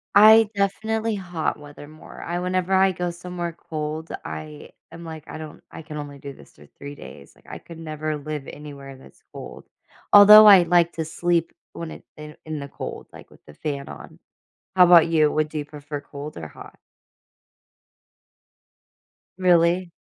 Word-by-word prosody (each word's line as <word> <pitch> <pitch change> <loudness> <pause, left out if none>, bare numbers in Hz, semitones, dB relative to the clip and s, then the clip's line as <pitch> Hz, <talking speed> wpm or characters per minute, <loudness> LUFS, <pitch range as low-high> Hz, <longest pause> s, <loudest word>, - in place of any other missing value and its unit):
I 220 +1 +7
definitely 220 +3 -1
hot 175 -6 -4
weather 145 0 -12
more. 155 +1 -13
I 175 +1 -4
whenever 185 +1 -1
I 190 0 +4
go 180 -1 -3
somewhere 175 0 -6 0.2
cold, 155 +1 -5 0.2
I 75 -1 -8 0.2
am 170 - -11
like, 160 -2 -9
I - - -8
don't, 155 -1 -10
I - - -9
can 155 -1 -9
only 145 -1 -8
do 140 0 -9
this - - -18
for 75 - -17
3 140 0 -9
days, 70 - -13
like, - - -26
I - - -7
could 170 - -13
never 155 -1 -4
live 150 -1 -7
anywhere 140 -2 -10
that's - - -19
cold. - - -10 0.5
Although 210 +1 +10
I 195 -3 +9
like 170 0 +2
to 160 - -4
sleep 170 +1 -1 0.2
when 165 -1 -7
it - - -11
in 150 0 -9
the - - -19
in 155 -1 -5
the 140 - -7
cold, - - -8
like - - -14
with - - -21
the 75 - -14
fan 140 - -5
on. - - -12 0.6
How 180 - +8
about 175 -2 +7
you? 155 -2 +3
Would 155 0 -2
you 150 - -3
prefer 145 0 -8
cold 145 +1 -10
or 80 -2 -7
hot? - - -14 2.6
Really? 175 -1 +2
160 Hz, 175 wpm, -23 LUFS, 145-180 Hz, 2.6 s, Although